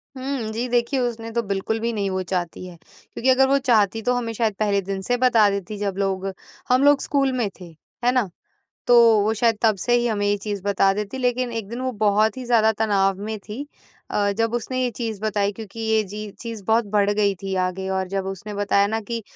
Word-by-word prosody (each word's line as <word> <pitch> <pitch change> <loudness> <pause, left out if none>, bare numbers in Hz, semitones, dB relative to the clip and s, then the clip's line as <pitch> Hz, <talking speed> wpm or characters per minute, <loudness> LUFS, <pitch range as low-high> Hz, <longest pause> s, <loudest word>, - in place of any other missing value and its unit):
हुँ, 260 -4 -3
जी, 235 +3 -2
देखिए 240 +3 +1
उसने 230 -2 -3
तो 235 +1 0
बिल्कुल 200 +2 -2
भी 230 +1 -1
नहीं 200 -2 -1
वो 190 0 -1
चाहती 180 -1 -3
है, 180 -1 -10 0.4
क्योंकि 260 - 0
अगर 265 +1 +5
वो 275 +1 +3
चाहती 225 -5 +2
तो 250 +3 +1
हमें 235 -2 -2
शायद 225 -1 0
पहले 205 -2 +2
दिन 195 0 -4
से 245 +6 0
बता 240 -4 +4
देती 200 +1 -4
जब 200 -2 -2
लोग 195 -1 -1 0.4
हम 255 +2 +4
लोग 285 -1 +5
स्कूल 275 -2 +1
में 230 -5 0
थे, 180 - -9 0.4
है 245 - +5
ना? 250 -6 +1 0.6
तो 245 - +6 0.3
वो 215 +2 +1
शायद 225 0 +2
तब 220 -2 +4
से 240 +5 0
ही 240 0 +2
हमें 205 -3 -1
ये 205 0 +2
चीज़ 205 -2 -3
बता 195 -1 +3
देती 210 +4 -4
लेकिन 250 -1 0
एक 225 -3 -4
दिन 235 +2 -5
वो 260 0 -1
बहुत 215 0 +2
ही 255 - -6
ज़्यादा 225 -2 +4
तनाव 195 -3 +2
में 220 0 -3
थी 210 +6 -7 0.5
अ, 205 -1 +1
जब 225 0 0
उसने 240 +2 -2
ये 250 - +1
चीज़ 225 -2 -4
बताई 205 -2 0
क्योंकि 220 +1 -10
ये 220 -1 +2
जी 210 +1 -7
चीज़ 230 -4 -6
बहुत 225 +2 +2
बढ़ 205 -1 +3
गई 205 -1 +2
थी 195 -1 -4
आगे 190 +1 -4
और 190 - -3
जब 195 0 -3
उसने 195 +2 -6
बताया 200 0 +2
ना 220 +2 -1
कि 230 +2 -4
220 Hz, 230 wpm, -23 LUFS, 200-240 Hz, 0.6 s, तो